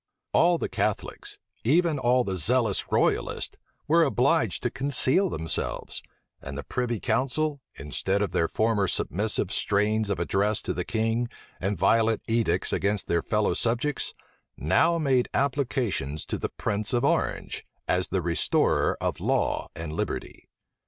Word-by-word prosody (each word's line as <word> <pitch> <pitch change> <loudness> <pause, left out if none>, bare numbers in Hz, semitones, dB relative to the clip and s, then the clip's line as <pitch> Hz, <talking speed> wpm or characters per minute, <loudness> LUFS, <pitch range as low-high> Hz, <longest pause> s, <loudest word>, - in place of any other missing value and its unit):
All 175 +1 +4
the - - -2
Catholics, - - -3 0.3
even 155 +4 +3
all 125 0 +3
the 95 -4 -3
zealous 110 +3 +1
royalists, - - +1 0.3
were 165 +2 +5
obliged 140 +3 +1
to 125 - 0
conceal 140 +7 +2
themselves; 80 - -2 0.4
and 70 0 -7
the 75 - -5
privy 120 -3 -2
council, 145 +5 0
instead 95 +8 -1
of 100 - -2
their 80 - +1
former 110 -1 +1
submissive 100 +2 0
strains 105 +1 +1
of 100 - -1
address 105 +2 +1
to - - -2
the - - -2
king, 115 +2 0 0.3
and 100 +1 -1
violent 115 +4 +3
edicts 115 -6 +1
against 100 0 0
their 85 - +1
fellow 105 -1 +1
subjects, 120 +5 -1 0.4
now 160 - +3
made 135 -6 +2
applications 125 - -1
to - - -3
the - - -2
prince 105 +2 -1
of 120 - +2
Orange, - - -1 0.2
as 90 0 +1
the 95 -2 -1
restorer 85 0 +1
of - - -2
law - - 0
and 80 -1 -5
liberty. - - -4
115 Hz, 145 wpm, -26 LUFS, 95-130 Hz, 0.4 s, were